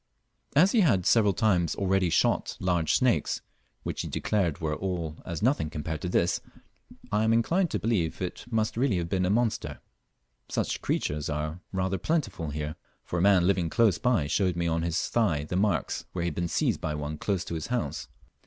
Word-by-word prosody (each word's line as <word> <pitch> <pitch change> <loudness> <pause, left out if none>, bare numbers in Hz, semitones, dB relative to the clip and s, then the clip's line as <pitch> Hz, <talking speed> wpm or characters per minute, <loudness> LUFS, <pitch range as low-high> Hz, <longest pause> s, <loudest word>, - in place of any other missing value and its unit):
As 180 +7 +6
he 230 - +4
lead 100 - +3
several 105 -3 +5
times 90 -3 +1
already 95 -2 +1
shot 85 - +1
large 90 -3 +1
snakes, 125 -3 +1 0.4
which - - -3
he - - -4
declared 90 -8 0
were 80 -2 -1
all 85 -4 -3
as 85 -1 -4
nothing 125 - +2
compared 75 0 -4
with 90 - -3
this, 85 - +2 0.7
I 105 +1 +2
am 110 - +3
inclined 165 +11 +2
to - - -1
believe 100 -8 0
it 90 -1 -5
must 110 -2 0
really 120 -4 +1
have 85 -1 -2
been 90 0 +1
a - - 0
monster. 115 +1 0 0.7
Such - - -1
creatures 75 0 -1
are 75 +3 -3
rather 95 0 -1
plentiful 100 - -1
here, 75 +1 -4 0.3
for 90 - -2
a - - +1
man 95 -2 +5
living 90 -3 +2
close 110 +2 +3
by 120 - +2
showed 90 +4 +1
me 85 0 -1
on 85 0 0
his 85 -1 -1
thigh 85 -11 +1
the 75 - -4
marks 95 -6 0
where 85 - -2
he - - 0
had - - -6
been 85 0 -1
seized - - 0
by 75 - -2
one 75 +1 -4
close 95 -4 -1
to - - -5
his 80 -2 -3
house. 120 - -2
90 Hz, 200 wpm, -28 LUFS, 80-110 Hz, 0.7 s, As